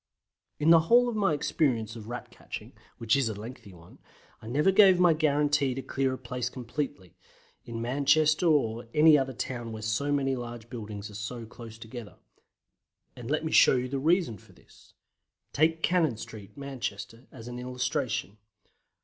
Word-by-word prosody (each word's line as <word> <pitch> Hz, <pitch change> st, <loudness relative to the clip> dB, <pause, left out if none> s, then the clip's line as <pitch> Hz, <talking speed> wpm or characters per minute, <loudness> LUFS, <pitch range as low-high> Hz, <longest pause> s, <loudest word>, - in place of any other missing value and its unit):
In 155 Hz, +2 st, +3 dB
the 165 Hz, -, +8 dB
whole 245 Hz, +1 st, +6 dB
of 240 Hz, -, -2 dB
my 200 Hz, -5 st, +2 dB
experience 120 Hz, -7 st, 0 dB
of 110 Hz, -2 st, -9 dB
Rat 120 Hz, +1 st, -7 dB
catching, -, -, -9 dB, 0.2 s
which 115 Hz, +1 st, +2 dB
is 135 Hz, -4 st, +1 dB
a 110 Hz, -, -4 dB
lengthy 110 Hz, 0 st, -10 dB
one, 85 Hz, -1 st, -17 dB, 0.4 s
I 110 Hz, -, -11 dB
never 150 Hz, +10 st, +2 dB
gave 190 Hz, -2 st, +6 dB
a 175 Hz, -2 st, +5 dB
guarantee 145 Hz, -3 st, +1 dB
to 135 Hz, -, -4 dB
clear 135 Hz, -1 st, -1 dB
a -, -, -9 dB
place 125 Hz, 0 st, -4 dB
completely, 125 Hz, -, -5 dB, 0.5 s
in 115 Hz, -1 st, -5 dB
Manchester 145 Hz, +6 st, +3 dB
or 120 Hz, -7 st, +1 dB
any 155 Hz, 0 st, +7 dB
other 135 Hz, -2 st, +1 dB
town 120 Hz, -1 st, -5 dB
where 110 Hz, -1 st, -7 dB
so 125 Hz, +7 st, -1 dB
many 135 Hz, -2 st, +1 dB
large 120 Hz, -2 st, -8 dB
buildings 105 Hz, -3 st, -7 dB
are -, -, -13 dB
so 115 Hz, +3 st, -6 dB
close 115 Hz, 0 st, -11 dB
together. 115 Hz, -1 st, -9 dB, 1.0 s
And 120 Hz, 0 st, -8 dB
let 155 Hz, +2 st, 0 dB
me 160 Hz, -, -2 dB
show 125 Hz, -1 st, +5 dB
the 135 Hz, +2 st, -3 dB
reason 160 Hz, -, +1 dB
for -, -, -20 dB
this. -, -, -22 dB, 0.6 s
Take 160 Hz, +2 st, +2 dB
Cannon 165 Hz, -10 st, +2 dB
Street, 110 Hz, 0 st, -10 dB
Manchester, 125 Hz, -4 st, -6 dB
as 120 Hz, -3 st, -11 dB
an 125 Hz, 0 st, -6 dB
illustration. 125 Hz, -4 st, -3 dB
125 Hz, 170 wpm, -28 LUFS, 115-150 Hz, 1.0 s, the